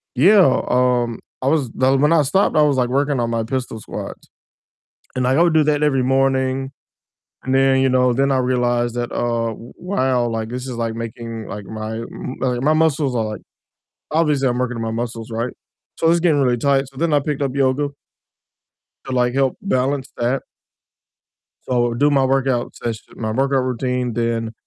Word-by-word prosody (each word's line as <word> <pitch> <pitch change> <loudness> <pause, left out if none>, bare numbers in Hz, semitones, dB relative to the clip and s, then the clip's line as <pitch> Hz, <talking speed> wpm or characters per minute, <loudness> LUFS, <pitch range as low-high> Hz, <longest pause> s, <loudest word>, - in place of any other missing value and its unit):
yeah, 175 - +5
um, 125 -2 +1 0.2
I - - 0
was 140 -4 +1
The 130 +1 +2
When 150 +4 +3
I 160 - +5
stopped, 190 +9 +1
I 155 - +5
was, 145 -3 +2
like, 125 -1 +1
working 140 +1 +1
on 120 -1 0
my 115 -1 0
pistol 125 -1 -4
squats, - - -8 0.9
and, 130 -1 0
like, 130 +2 +2
I 170 - +5
would 170 -2 +3
do 155 -1 +4
that 150 0 +1
every 135 -4 +2
morning, 135 0 +1 0.7
and 130 - -1
then, 135 0 +4
you 135 - +3
know, 125 -1 +3
then 135 +2 +1
I 135 - +2
realized 120 -2 0
that, 120 0 -3
uh, 115 -1 -1
w 115 - -12
wow, 130 -10 0
like, 115 -1 -3
this 125 +2 -5
is, 125 - -5
like, 115 -1 -2
making, 115 -1 -6
like, 105 -1 -7
my, 110 +1 -6
m 115 +3 -7
like, 125 -2 0
my 155 +2 +4
muscles 155 -4 +1
are 115 -2 0
like 105 - -8 0.7
Obviously, 150 -4 +2
I'm 125 - -1
working 125 -1 -1
on - - -3
my 115 - -2
muscles, 115 -1 -6
right? 115 +2 -3 0.4
So, 165 - +2
it's 170 0 +3
getting 160 -4 +3
really 125 -2 +2
tight 140 +2 +2
so, 135 - -20
then 165 -1 0
I 145 - +4
picked 145 0 -3
up 135 -2 -1
yoga 140 +2 +1 1.2
to, 130 - -5
like, 125 0 +1
help 135 -1 +1
balance 135 -6 -1
that. 120 +3 0 1.3
So, 120 -1 +1
do 145 +5 +3
my 135 -2 +3
workout 130 -2 0
session 115 -2 -6
my 110 -2 -3
workout 135 +1 +1
routine, 125 -1 -2
then, 115 -1 -1
130 Hz, 195 wpm, -20 LUFS, 120-140 Hz, 1.3 s, yeah